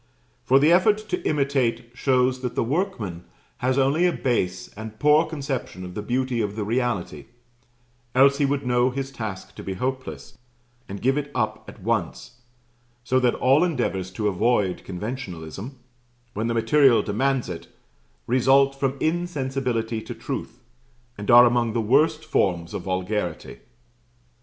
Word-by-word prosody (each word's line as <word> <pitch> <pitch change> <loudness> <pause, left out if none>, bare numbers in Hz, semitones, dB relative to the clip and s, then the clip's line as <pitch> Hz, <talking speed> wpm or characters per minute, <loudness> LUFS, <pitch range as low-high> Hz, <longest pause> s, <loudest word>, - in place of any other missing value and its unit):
For 135 - +4
the 150 +4 +4
effort 190 +4 +5
to - - -1
imitate 130 -5 0
shows 130 0 +1
that 125 -2 -4
the - - +1
workman 115 - -2 0.3
has 130 +1 0
only 140 +6 +3
a - - +2
base 95 - -1
and 110 +1 -9
poor 150 +4 +4
conception 135 - -5
of 90 - -8
the 105 - -4
beauty 125 +2 -1
of 105 -1 -3
the 110 - -2
reality 105 - -2 0.9
else 140 +2 +5
he 145 - +3
would 140 -1 -1
know 125 0 +2
his 135 +1 -4
task 110 -7 -6
to - - -10
be 95 - -4
hopeless, 130 +5 -5 0.5
and 100 +1 -7
give 135 +3 +2
it 145 0 -6
up 110 -2 -2
at 95 - -13
once; 115 +2 -2 0.6
so 130 +2 +2
that 125 -2 +2
all 135 +5 +4
endeavours 120 - -1
to 105 +2 -1
avoid 105 -1 +1
conventionalism, 100 - -6 0.6
when 110 +3 -2
the 115 - -1
material 120 +2 +4
demands 130 +5 0
it, 90 -2 -7 0.6
result 135 +3 +4
from 135 0 -2
insensibility 130 -9 -1
to - - -8
truth, - - -6 0.5
and 105 0 -7
are 120 +1 +9
among 120 -2 +1
the 115 - 0
worst 150 +8 +2
forms 85 - 0
of - - -3
vulgarity. 95 -2 -3
125 Hz, 150 wpm, -24 LUFS, 105-135 Hz, 0.9 s, are